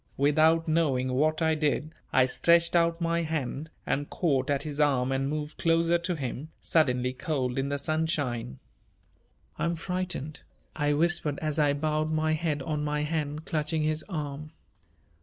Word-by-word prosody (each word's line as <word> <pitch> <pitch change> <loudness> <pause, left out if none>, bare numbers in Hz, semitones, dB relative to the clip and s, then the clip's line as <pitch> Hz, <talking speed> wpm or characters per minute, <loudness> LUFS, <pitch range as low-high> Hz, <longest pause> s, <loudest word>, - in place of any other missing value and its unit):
Without 155 +3 +3
knowing 135 -6 +1
what 155 +4 +2
I 160 0 +3
did 155 0 0 0.2
I 130 - +5
stretched 170 +6 +3
out 170 0 +3
my 170 0 +1
hand 155 -1 -3 0.2
and 145 +1 -1
caught 140 -6 0
at 140 -1 +1
his 150 -2 -5
arm 135 -3 +2
and 135 +1 0
moved 150 0 -4
closer 165 +1 +3
to 175 +1 -2
him, 140 +1 -5
suddenly 125 -5 +1
cold 130 -4 -2
in 135 +1 -1
the 145 - -1
sunshine. 145 - -1 1.0
"I'm 170 0 0
frightened," 180 -4 -4 0.4
I 145 -1 +1
whispered, 155 -2 +1
as 155 0 -2
I 145 -1 +4
bowed 155 +1 -1
my 155 0 +1
head 155 -3 -1
on 150 0 -2
my 150 0 -1
hand, 150 0 -3
clutching 155 0 -1
his 155 0 0
arm. 150 -2 -5
155 Hz, 160 wpm, -28 LUFS, 140-160 Hz, 1.0 s, I